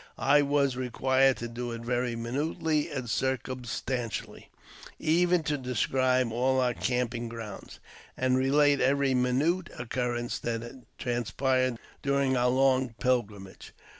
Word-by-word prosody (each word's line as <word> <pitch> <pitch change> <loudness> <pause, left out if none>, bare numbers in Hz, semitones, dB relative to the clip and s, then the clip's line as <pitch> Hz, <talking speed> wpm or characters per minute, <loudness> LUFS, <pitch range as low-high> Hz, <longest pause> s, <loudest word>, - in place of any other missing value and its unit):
I 145 +2 +4
was 140 -2 +1
required 130 +1 +2
to 120 - -5
do 120 +1 -5
it 115 - -6
very 120 0 -1
minutely 145 +6 -1
and 135 -5 -4
circum 130 +1 -1
stantially 120 -1 -4 0.4
— - - -14
even 175 +2 +2
to 150 -1 -1
describe 130 0 +1
all 130 +3 +1
our 125 -1 +2
camping 120 -1 -2
grounds, 115 -3 -8 0.4
and 130 0 +2
relate 140 +2 +3
every 140 0 +2
minute 140 +8 +1
occurrence 120 0 -2
that 120 +2 -5 0.2
transpired 130 +1 0 0.2
during 140 -1 +1
our 125 0 +2
long 130 -2 +2
pilgrimage. 105 -7 -2
130 Hz, 130 wpm, -28 LUFS, 120-135 Hz, 0.4 s, I